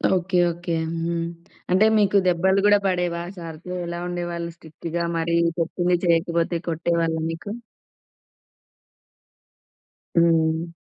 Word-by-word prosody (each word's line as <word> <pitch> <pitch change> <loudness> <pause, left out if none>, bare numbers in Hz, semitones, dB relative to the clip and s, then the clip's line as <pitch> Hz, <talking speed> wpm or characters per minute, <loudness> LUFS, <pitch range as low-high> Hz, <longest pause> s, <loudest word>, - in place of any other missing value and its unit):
Okay. 180 0 +1
Okay. 170 0 -4 0.3
హ్మ్. 170 0 -1 0.5
అంటే 190 +4 +5
మీకు 205 -1 +4
దెబ్బలు 190 +3 +3
గూడా 205 0 +6
బడేవా 175 -2 0 0.2
సారుతో? 165 +1 -8
ఎలా 170 0 -4
ఉండేవాళ్ళు 175 -1 -3
స్ట్రిక్ట్‌గా 165 +2 -5
మరి 170 +1 0 0.2
చెప్పింది 175 +2 +1
చేయకపోతే 170 0 +2
కొట్టేవాళ్ళా 165 0 0
మీకు? 165 +5 -7 2.7
హ్మ్. 165 0 +3
170 Hz, 100 wpm, -23 LUFS, 165-180 Hz, 2.7 s, గూడా